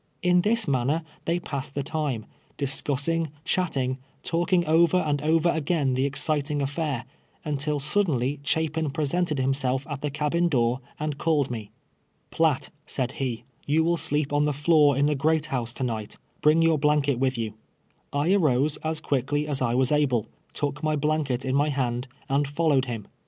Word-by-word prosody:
In 180 0 +4
this 220 +3 +2
manner 140 +5 +1 0.2
they 170 +1 +1
passed 140 -4 -5
the 140 - -1
time, 145 -7 -2 0.3
discus 140 0 -1
sing, 165 0 0 0.2
chatting, 135 -9 0 0.2
talking 175 +1 +1
over 165 +3 +4
and 150 -5 0
over 160 +2 +3
again 155 -4 +1
the 130 +2 +1
exci 145 +2 0
ting 145 0 -2
affair, 140 -2 -2 0.4
until 150 0 -1
suddenly 145 -4 +1
Chapin 160 +1 0
presented 155 +3 0
himself 135 0 0
at 145 -3 -5
the 150 - -1
cabin 150 +4 +1
door 120 -3 +1 0.2
and 150 -1 -3
called 150 -5 +1
me. 110 -4 -5 0.3
" - - -44
Piatt," 160 -5 +1 0.2
said 130 -2 -1
he, 120 -3 -2
" - - -34
you 155 +3 +3
will 170 +1 +2
sleep 145 -3 0
on 145 0 +3
the 150 - +1
floor 150 -1 +4
in 140 - +3
the 150 - +2
great 155 +2 +1
house 120 -3 -1
to 130 - -4
night; 110 -4 -3 0.2
bring 155 +2 +5
your 165 -2 +3
blanket 145 -3 +2
with 130 -1 +1
you." 110 -2 -3 0.6
I 145 +6 +2
arose 150 -5 +2
as 160 0 -3
quickly 145 +1 0
as 140 -3 -1
I 120 -1 +1
was 130 +1 +2
able, 135 -7 +2 0.3
took 145 0 -2
my 155 -1 +1
blanket 145 -4 0
in 130 - -1
my 145 +2 +3
hand, 125 -2 -1 0.2
and 140 +1 +1
followed 145 -2 +2
him. 115 -5 -5
145 Hz, 180 wpm, -26 LUFS, 135-160 Hz, 0.6 s, bring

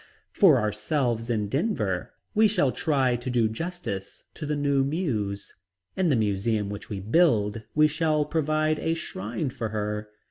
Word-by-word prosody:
For 175 - +6
ourselves 115 +2 -1
in 105 -3 0
Denver, 105 - -1 0.2
we 220 +1 +5
shall 170 -11 +2
try 135 -6 +1
to 120 +2 -5
do 120 -3 +2
justice 110 - -5
to 155 - -6
the 150 - 0
new 140 -1 +2
Muse. 120 - -2 0.4
In 185 -3 +2
the 140 - +3
museum 105 -1 0
which 105 0 -7
we 100 - -4
build 110 - +2
we 155 0 +6
shall 155 -1 +1
provide 155 0 0
a 165 0 0
shrine 120 - -4
for 115 -2 -4
her. 105 0 -3
125 Hz, 155 wpm, -26 LUFS, 105-155 Hz, 0.4 s, For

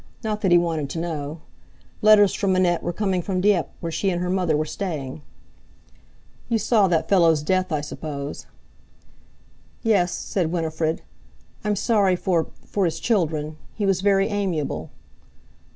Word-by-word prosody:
Not 215 -1 -2
that 190 - +2
he 175 - +8
wanted 165 -4 0
to 165 - -4
know. 155 -2 -4 0.6
Letters 210 -2 +6
from 195 -2 +1
Annette 175 -2 +2
were - - -2
coming 190 -1 -1
from 185 +1 -2
Dieppe, 185 -6 +2
where 170 - -3
she 195 +4 0
and 175 -2 -1
her 180 0 -1
mother 180 -5 +1
were 155 - 0
staying. 155 -6 -5 1.3
"You 230 - +2
saw 215 -1 +3
that 165 -2 +1
fellow's 165 -6 +4
death, 185 +2 0
I 150 -2 0
suppose?" 145 -1 -6 1.4
"Yes," 195 -6 +3
said 175 -5 -2
Winifred. 160 -1 -1 0.6
"I'm 210 0 0
sorry 200 -3 +2
for—for 180 +2 -1
his 165 -1 -1
children. 155 -8 0 0.2
He 210 - -1
was 195 -2 +2
very 195 -1 +3
amiable." 170 - -2
175 Hz, 150 wpm, -23 LUFS, 160-195 Hz, 1.4 s, he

